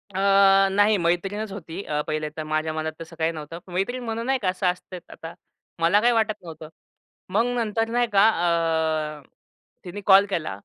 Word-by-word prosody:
अ, - - -1 0.5
नाही, 205 +2 +3
मैत्रीणच 195 +5 -1
होती. 180 -2 -7
अ, 150 0 -2
पहिले 155 0 -2
तर 155 - -3
माझ्या 155 +1 -2
मनात 155 0 -3
तसं 165 0 -10
काही 160 +1 +1
नव्हतं. 160 +1 -8
मैत्रीण 245 +8 -2
म्हणून 230 0 -4
नाही 265 +1 +1
का 190 - 0
असं 185 +1 -3
असतं 180 +1 -3 0.2
आता, 165 +1 -9 0.5
मला 170 +5 +4
काही 240 +1 +3
वाटत 220 -1 +1
नव्हतं. 160 -2 -10 0.6
मग 215 +5 +1
नंतर 225 -1 -1
नाही 240 +1 +1
का, 200 +2 +6
अ, 160 -4 0 0.6
तिने 185 +3 -7
कॉल 195 0 +7
केला 170 -5 -2
180 Hz, 175 wpm, -24 LUFS, 160-210 Hz, 0.6 s, कॉल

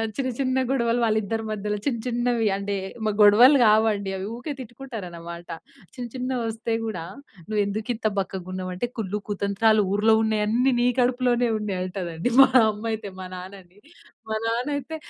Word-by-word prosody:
చిన్న, 265 -2 -1
చిన్న 260 -1 +1
గొడవలు 235 -3 +1
వాళ్ళ 220 -1 +2
ఇద్దరి 225 +2 -3
మధ్యలో 210 -1 -2
చిన్న 245 -5 0
చిన్నవి 240 -2 0
అంటే, 200 +1 -3 0.3
‌మగొడవలు 215 +6 +6
కావండి 210 -2 +3
అవి, 190 0 -4
ఊకే 245 +5 -6
తిట్టుకుంటారు 240 -3 -8
అన్నమాట. 170 0 -9 0.5
చిన్న 245 -1 -6
చిన్నవి 255 -1 -2
వస్తే 225 +1 -3
గూడా, 210 -7 -4 0.4
"నువ్వు 215 -1 0
ఎందుకు 215 +3 -4
ఇంత 220 0 -1
బక్కగా 190 -2 -3
ఉన్నావ్ 185 0 -4
అంటే 215 +7 -2
కుళ్ళు 210 -2 -2
కుతంత్రాలు 205 +2 +2
ఊర్లో 210 +2 +3
ఉన్నవి 220 -1 +1
అన్ని 245 +5 +2
నీ 240 - +3
కడుపులోనే 245 -1 +2
ఉన్నాయి" 200 -3 -3
అంటది 180 +2 -3
మా 270 - +7 0.2
అమ్మ 210 +1 -10
అయితే 215 -2 -5
మా 185 - -6
నాన్న‌న్ని. 185 +1 -11 0.5
మా 220 - -1
నాన్న 235 +4 -1
అయితే, 285 +3 -6
220 Hz, 165 wpm, -24 LUFS, 200-240 Hz, 0.5 s, మా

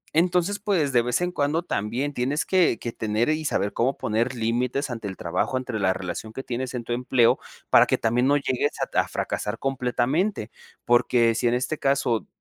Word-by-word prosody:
Entonces, 180 +4 +2
pues, 175 -10 0
de 120 - +5
vez 125 +6 0
en 180 0 0
cuando 155 +1 0
también 125 +3 -2
tienes 135 +4 -1
que 185 -10 +3
que 120 - -5
tener 110 +2 -1
y 155 0 -1
saber 100 -8 0
cómo 130 +4 0
poner 115 +4 -1
límites 125 +4 -1
ante 115 -3 -5
el 95 -2 -7
trabajo, 90 +9 -1
entre 125 -4 -4
la 95 -1 +2
relación 95 +4 -5
que 135 - -6
tienes 130 +1 -4
en 120 - -3
tu 120 - -3
empleo 120 -1 +3 0.3
para - - +7
que - - +2
también 120 +3 +1
no 145 +1 +4
llegues 135 +1 -1
a - - +2
t - - -1
a - - +1
fracasar 105 +2 -3
completamente. 130 - -1 0.3
Porque 120 -1 +3
si 120 +1 0
en 120 - +2
este 130 +5 -2
caso 135 -5 +1
125 Hz, 205 wpm, -24 LUFS, 115-145 Hz, 0.3 s, para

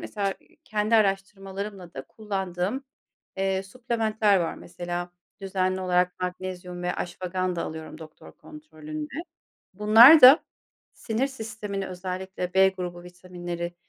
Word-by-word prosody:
mesela, 205 -2 -3
ııı, 195 - -2 0.3
kendi 215 0 0
araştırmalarımla 195 -2 -2
da 135 - -6
kullandığım, 195 +3 -3 0.5
eee, 190 0 0
supplement'ler 220 -1 0
var 165 - -2
mesela 175 0 -6 0.3
düzenli 190 -1 -1
olarak 180 0 +1
magnezyum 180 -1 -5
ve 180 - -1
ashwagandha 180 0 -3
alıyorum 160 0 -7
doktor 155 -1 -13
kontrolünde. 155 - -9 0.6
Bunlar 225 - +8
da 260 +5 +9 0.5
sinir 230 +4 -1
sistemini, 215 -6 -6
özellikle 185 0 -5
B 190 0 +6
grubu 180 -2 -6
vitaminleri, 175 -1 -7
190 Hz, 110 wpm, -26 LUFS, 180-210 Hz, 0.6 s, da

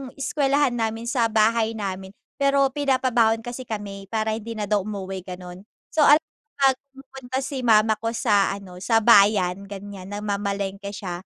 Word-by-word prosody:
eskwelahan 280 0 +1
namin 225 -1 -2
sa 235 -1 +1
bahay 225 +1 +2
namin, 195 -2 -5 0.2
pero 275 -1 +3
pinapabaon 255 -5 +1
kasi 245 +1 -7
kami 200 -2 -6
para 220 +1 -1
hindi 225 +1 -5
na 210 - -2
daw 205 0 +1
umuwi, 195 -2 -5
ganon. 180 +2 -10 0.2
So, 315 - +1
al 295 - +8 0.4
'pag 270 -2 +3 0.2
pumupunta 265 -1 -6
si 270 0 -4
mama 220 -3 +4
ko 230 +1 -3
sa 205 -4 +2
ano, 185 -3 -11
sa 225 +3 +2
bayan 200 -3 +4
ganyan, 200 -1 -9
namamalengke 200 -1 -3
siya 185 -2 -6
220 Hz, 155 wpm, -23 LUFS, 195-245 Hz, 0.4 s, al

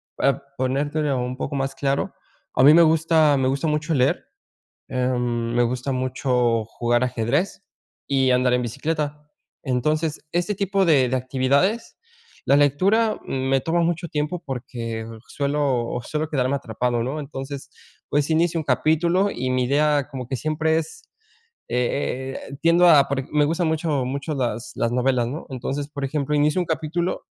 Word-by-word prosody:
para 140 0 +1 0.2
ponértelo 140 +2 0
un 125 +1 -3
poco 145 - -4
más 135 0 -2
claro. 140 0 -1 0.4
A - - +4
mí 145 - +9
me 170 - +7
gusta, 160 -2 +4
me 130 -1 +1
gusta 140 +4 -1
mucho 150 +1 0
leer, 135 +4 +1 0.6
eh, 125 0 0
me 120 0 0
gusta 125 +3 -2
mucho 125 -3 0
jugar 120 +2 0
ajedrez 130 - -1 0.4
y 135 -2 +2
andar 125 0 +3
en 125 - +2
bicicleta. 150 +4 -3 0.3
Entonces, 150 +4 -1
este 175 +4 0
tipo 195 0 +1
de 135 -6 +4
de 130 - 0
actividades, 135 - 0 0.5
la 140 - +4
lectura 195 +11 +2
me 135 0 0
toma 170 +3 +1
mucho 170 0 -1
tiempo 155 +3 -2
porque 115 -3 -5 0.2
suelo 140 -4 -1
suelo 155 +4 -3
quedarme 135 -2 0
atrapado, 120 -1 -1
¿no?, 135 +5 -3
entonces, 140 0 -7 0.4
pues, 145 +1 +1
inicio 165 +1 +2
un 155 - -3
capítulo 170 +7 +2
y 130 +1 -2
mi 130 -1 +1
idea 145 +1 +2
como 130 -3 -6
que 135 - -2
siempre 155 +3 0
es, 445 - -8 0.7
eh 130 +2 -1
eh - - -6
eh, 140 - -8
tiendo 170 +2 +5
a 150 -4 +7
porque 135 -1 -2
me 150 - +4
gustan 165 +3 0
mucho, 155 -4 0
mucho 140 +4 -3
las 120 -3 -2
las 115 - 0
novelas, 125 -1 +1
¿no?, 145 +6 -6
entonces, 135 +2 -4
por 140 -2 -4
ejemplo, 150 +1 -2
inicio 150 +5 +2
un - - -2
capítulo 165 +2 -2
140 Hz, 160 wpm, -23 LUFS, 125-155 Hz, 0.7 s, mí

